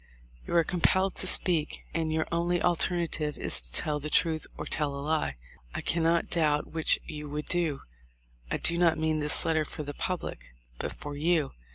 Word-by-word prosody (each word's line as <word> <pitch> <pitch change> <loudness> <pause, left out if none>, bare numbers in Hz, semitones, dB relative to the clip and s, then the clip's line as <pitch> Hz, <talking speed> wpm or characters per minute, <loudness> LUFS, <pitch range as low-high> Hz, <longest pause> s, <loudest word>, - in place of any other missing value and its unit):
You - - -2
are 170 - +6
compelled 185 +3 +2
to 190 - -1
speak; 165 -5 +1
and 160 0 -1
your 160 0 0
only 170 +1 +1
alternative 170 -3 +1
is - - 0
to - - -6
tell 150 - +1
the 150 +1 -4
truth 160 -1 +2
or - - -5
tell 145 -2 -1
a - - -5
lie. 150 - 0 0.4
I - - -2
can 170 - 0
not 165 +1 +2
doubt 150 -3 +1
which 160 -1 +4
you 150 -1 -7
would 150 +1 -4
do... 165 -6 -1 0.7
I - - 0
do 170 0 +2
not 165 -2 +4
mean 155 0 0
this 150 +3 +3
letter 160 -1 +2
for 150 +1 -7
the 145 0 -6
public, 175 - -4 0.2
but - - -3
for 145 -1 -7
you. 155 -1 +1
160 Hz, 195 wpm, -29 LUFS, 150-170 Hz, 0.7 s, are